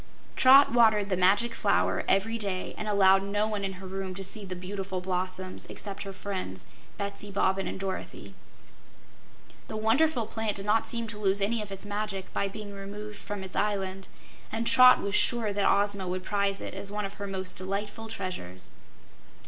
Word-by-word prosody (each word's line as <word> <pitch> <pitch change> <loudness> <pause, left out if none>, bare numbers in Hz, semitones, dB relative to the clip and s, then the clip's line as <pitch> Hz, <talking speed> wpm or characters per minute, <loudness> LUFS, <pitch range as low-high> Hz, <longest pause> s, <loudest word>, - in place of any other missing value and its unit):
Trot 270 +1 +8
watered 220 -4 +4
the 190 - +1
Magic 200 +6 +3
Flower - - +1
every 210 +4 +2
day 200 -5 -3
and 215 - -5
allowed 195 -2 +5
no 205 +2 0
one 210 -2 -3
in 195 -1 -2
her 190 +1 -10
room 190 0 -5
to 195 - -6
see 205 +3 -4
the 185 -2 -6
beautiful 190 +1 -4
blossoms 185 0 -3
except 200 -1 -6
her 195 - -5
friends, 185 - -5 0.3
Betsy 200 0 -4
Bobbin 195 -1 +1
and - - -5
Dorothy. 190 -1 -5 1.3
The 215 - -5
wonderful 235 +4 +2
plant 220 -1 -2
did 195 - -3
not 215 +2 +2
seem 235 -1 -2
to 210 -1 -8
lose 200 -1 +2
any 215 +3 +1
of 205 -2 -7
its 195 +1 -5
magic 205 -2 -4
by 200 - 0
being 205 0 -7
removed 205 +1 -7
from 205 -2 -5
its 190 - -8
island, 195 -2 -1 0.4
and 230 +1 -2
Trot 255 +1 +7
was 200 - -2
sure 225 -1 +2
that 200 0 +3
Ozma 200 -1 +1
would 185 +1 -3
prize 200 -1 0
it - - -6
as 200 - -5
one 210 0 -2
of 195 - -6
her 200 - -3
most 190 -1 -3
delightful 205 +4 -3
treasures. 135 - -6
200 Hz, 185 wpm, -28 LUFS, 190-210 Hz, 1.3 s, Trot